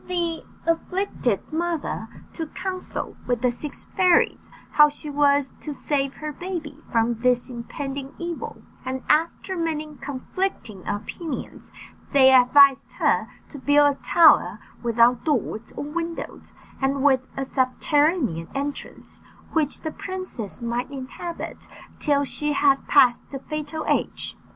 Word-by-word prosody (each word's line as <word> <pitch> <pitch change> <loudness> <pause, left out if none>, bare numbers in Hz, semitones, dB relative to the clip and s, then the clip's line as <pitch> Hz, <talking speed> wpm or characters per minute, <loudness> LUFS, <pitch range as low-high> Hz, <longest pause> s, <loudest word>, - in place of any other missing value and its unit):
The 340 -2 -1 0.2
afflicted 330 - -1
mother 325 -8 -2 0.3
took 325 -2 -6
council 370 -1 -5
with 245 -1 0
the 250 - +4
six 285 +5 -6
fairies 365 -3 +3 0.2
how 300 -1 +7
she 295 0 -8
was 285 -1 +3
to 300 -2 -6
save 275 -2 -1
her 305 -1 -5
baby 320 -3 -6
from 230 0 +1
this 250 +1 +2
impending 270 +3 -6
evil, 340 -1 -6 0.2
and 260 0 -4
after 330 +4 +1
many 310 -3 -2
conflicting 265 - -4
opinions 260 +8 -5 0.4
they 265 -1 +7
advised 270 +2 +6
her - - +1 0.2
to 285 - -9
build 290 +1 +4
a - - -28
tower 330 -3 +5 0.2
without 235 +1 +3
doors 240 -7 -1
or - - -3
windows, 335 +3 -5 0.3
and 270 0 +1
with 265 -3 +5 0.2
a 270 - -1
subterranean 260 - +1
entrance, 280 +1 -5 0.3
which 310 -3 0
the 315 - -3
princess 370 - -6
might 235 +2 -2
inhabit 280 +5 -7 0.3
till 285 -2 +2
she 295 +2 -2
had 275 -1 +3
passed 245 -2 +5
the 275 - -5
fatal 305 +2 -5
age. - - -1
285 Hz, 130 wpm, -24 LUFS, 255-320 Hz, 0.4 s, how